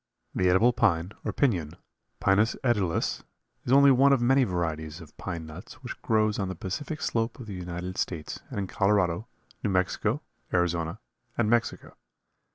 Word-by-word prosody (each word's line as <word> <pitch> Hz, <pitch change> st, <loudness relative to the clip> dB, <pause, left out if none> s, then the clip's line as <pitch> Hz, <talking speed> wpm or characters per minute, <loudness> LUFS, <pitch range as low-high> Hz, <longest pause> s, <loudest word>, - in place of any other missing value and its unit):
The 90 Hz, 0 st, +2 dB
edible 110 Hz, +7 st, +5 dB
pine, 95 Hz, -7 st, +2 dB
or -, -, -1 dB
piñon 90 Hz, -, 0 dB, 0.4 s
(Pinus 100 Hz, +4 st, +3 dB
edulis), 105 Hz, -9 st, +1 dB, 0.4 s
is 120 Hz, -, -1 dB
only 140 Hz, +1 st, +7 dB
one 135 Hz, +2 st, +5 dB
of 135 Hz, -, +4 dB
many 130 Hz, +3 st, +4 dB
varieties 80 Hz, -4 st, -3 dB
of 80 Hz, -4 st, -13 dB
pine 85 Hz, -4 st, -5 dB
nuts 80 Hz, -1 st, -10 dB
which -, -, -7 dB
grows 110 Hz, -1 st, +2 dB
on 95 Hz, -, -1 dB
the 95 Hz, -, -4 dB
Pacific 140 Hz, -, -4 dB
Slope 115 Hz, +1 st, -1 dB
of 125 Hz, -, -7 dB
the 105 Hz, -, -7 dB
United 90 Hz, 0 st, -5 dB
States 80 Hz, -4 st, -3 dB
and -, -, -6 dB
in 100 Hz, -, -1 dB
Colorado, 100 Hz, +1 st, +1 dB, 0.4 s
New 105 Hz, -, +1 dB
Mexico, 90 Hz, -2 st, 0 dB, 0.3 s
Arizona 85 Hz, +1 st, 0 dB, 0.4 s
and 110 Hz, -2 st, +2 dB
Mexico. 120 Hz, 0 st, 0 dB
95 Hz, 165 wpm, -28 LUFS, 85-115 Hz, 0.4 s, only